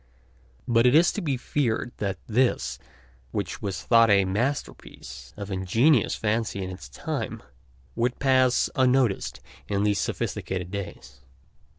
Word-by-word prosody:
But 115 0 +4
it 125 - +4
is 170 +2 +6
to 210 - -4
be 145 -7 -1
feared 120 -2 -1
that 100 -2 -2
this, 125 +3 0 0.5
which - - -4
was 95 -3 -4
thought 115 -1 +5
a 100 -1 +5
masterpiece 95 - -4
of 100 -1 -6
ingenious 110 - +2
fancy 110 -2 -1
in 95 - -5
its 75 -7 -9
time, 65 - -5 0.5
would 120 +1 0
pass 130 -2 +3
unnoticed 130 -5 +1 0.3
in 100 -1 0
these 105 -1 +2
sophisticated 90 -1 -3
days. 65 -10 -7
110 Hz, 130 wpm, -26 LUFS, 95-125 Hz, 0.5 s, is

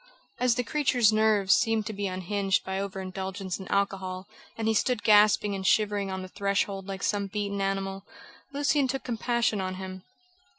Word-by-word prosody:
As 250 -2 +3
the 250 - 0
creature's 250 -6 +2
nerves 215 -3 +4
seemed 225 -2 +1
to 215 - -4
be 200 0 -2
unhinged 190 +1 -1
by 190 0 -2
over 195 -1 -4
indulgence 190 0 -5
in 190 - -8
alcohol, 190 -1 -1 0.3
and 225 -1 -2
he 220 - +3
stood 240 +1 0
gasping 210 -1 +5
and 195 -1 -4
shivering 205 0 +2
on 190 0 -4
the - - -7
threshold 200 0 -1
like 195 0 -5
some 200 -1 0
beaten 200 0 -3
animal, 195 0 -2 0.5
Lucian 285 0 +1
took 270 +1 -3
compassion 235 -3 0
on 185 0 -3
him. 185 0 -7
200 Hz, 175 wpm, -27 LUFS, 190-220 Hz, 0.5 s, gasping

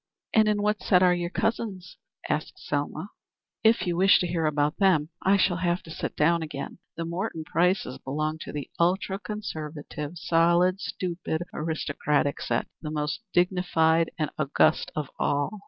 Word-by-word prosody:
"And 220 -1 +5
in 205 -1 +1
what 210 0 +1
set 180 -1 +4
are 180 -1 +5
your 175 -1 -2
cousins?" 195 -3 -2 0.3
asked - - -1
Selma. - - -3 0.5
"If 225 -3 +4
you 175 -1 0
wish 190 +2 +6
to - - 0
hear 165 -2 0
about 150 +1 +1
them, 175 -6 +3
I 195 +1 +4
shall 185 -2 +2
have 175 -1 0
to 160 - -11
sit - - -4
down 170 +3 +3
again. 150 +1 -6 0.2
The 165 - -2
Morton 170 -1 -3
Prices 170 -1 0
belong 155 +3 -2
to - - -7
the 145 -2 -5
ultra 190 +3 +1
conservative, 155 -7 -6
solid, 175 +3 +3
stupid, 175 -3 -3
aristocratic 150 -2 -1
set - - 0 0.2
the 155 - -5
most 150 -1 -2
dignified 170 -2 +2
and 155 -3 -1
august 155 +2 +2
of 150 -3 -3
all. 145 +9 0
170 Hz, 160 wpm, -27 LUFS, 155-185 Hz, 0.5 s, wish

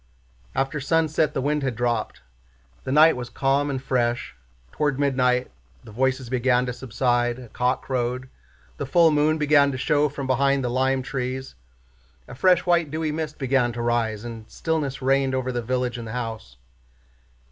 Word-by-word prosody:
After 135 +2 -1
sunset 155 +1 +1
the 135 - -1
wind 150 +1 0
had 130 -4 -2
dropped. 120 - -2 0.6
The - - -2
night 155 +3 +6
was 125 -1 -6
calm 140 +3 +1
and 135 -2 -2
fresh. 120 - -1 0.4
Toward 145 -3 0
midnight 125 -3 +1 0.3
the 115 - -12
voices 130 +2 0
began 125 0 +2
to 125 - -3
subside, 120 0 0
a 125 -3 -11
cock 125 +3 -1
crowed, 125 0 -2 0.5
the - - -4
full 170 -2 +5
moon 150 +1 +2
began 145 -2 +4
to 130 - -4
show 145 +3 +2
from 140 -1 -6
behind 135 +1 +2
the 125 - -1
lime 130 +1 +1
trees, 130 -1 -4 0.7
a - - -10
fresh 180 +6 +3
white 170 -3 +2
dewy 155 +1 -2
mist 155 -1 -4
began 135 -2 +1
to 120 - -4
rise, 115 -3 0
and 115 -2 -8
stillness 145 -5 -2
reigned 135 0 +2
over 130 0 -1
the 120 -1 -2
village 125 0 -2
and 115 - -7
the 110 - -6
house. 110 - -5
130 Hz, 170 wpm, -24 LUFS, 120-145 Hz, 0.7 s, night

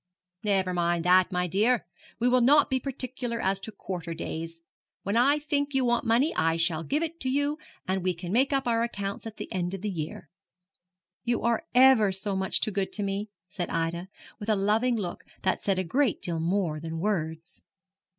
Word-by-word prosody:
'Never 190 -3 +1
mind 170 -1 0
that, 185 +1 +5
my 180 0 0
dear. 210 +7 +2 0.3
We 240 - +2
will 250 0 +4
not 285 +5 +5
be 260 - +2
particular 255 -3 -4
as 190 -1 +1
to 220 - -6
quarter 175 -4 -5
days. 165 +1 -5 0.4
When 200 +2 -1
I 275 +5 +5
think 290 -1 -1
you 265 -1 +3
want 240 0 +1
money 245 +8 +3
I 165 +1 +2
shall 165 -1 +1
give 290 - 0
it 330 +1 -5
to 260 - -2
you, 285 +3 0 0.3
and 190 0 0
we 180 0 0
can 175 +1 -6
make 260 +6 +3
up 270 -2 0
our 230 -1 +2
accounts 200 -2 -3
at 220 - -9
the - - -7
end 180 0 -1
of 190 - -8
the 210 - -1
year.' 155 -3 -5 1.0
'You 240 0 0
are 235 +8 +1
ever 250 -6 +6
so 195 +1 0
much 190 0 +1
too 215 - 0
good 195 -1 -1
to 205 - +1
me,' 200 +2 -2 0.2
said 175 -1 -4
Ida, 165 +2 -2 0.3
with 210 0 -5
a 215 - +4
loving 215 +5 +2
look 185 -6 -4 0.2
that 190 - +1
said 195 -2 +1
a 185 - +1
good 255 - +1
deal 170 -2 -2
more 170 -2 0
than 165 +1 -5
words. 160 -4 -3
200 Hz, 205 wpm, -27 LUFS, 175-245 Hz, 1.0 s, ever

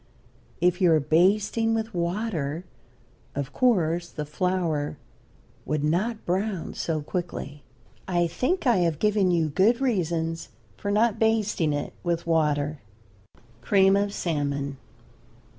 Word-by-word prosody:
If 180 +2 +2
you 180 -2 +5
are 155 - +5
basting 200 +9 +2
with 225 0 -3
water 170 -3 -2 0.7
of 140 -2 -4
course 175 -8 +2
the 150 - -5
flour 165 -2 -1 0.7
would 150 -1 -2
not 210 +9 0
brown 190 0 -2
so 155 -3 -2
quickly. 150 -4 -5 0.5
I 175 -2 +2
think 300 - -1
I 240 -4 +4
have 170 -4 +1
given 205 0 +2
you 165 -3 +2
good 195 +10 +3
reasons 165 -9 -1 0.3
for 205 - -4
not 215 +1 +2
basting 215 -8 +2
it 145 0 -3
with 170 -1 -1
water. 150 -3 +1 0.8
CREAM 195 - +4
OF 200 0 +1
SALMON. 140 -6 -2
175 Hz, 125 wpm, -26 LUFS, 155-205 Hz, 0.8 s, you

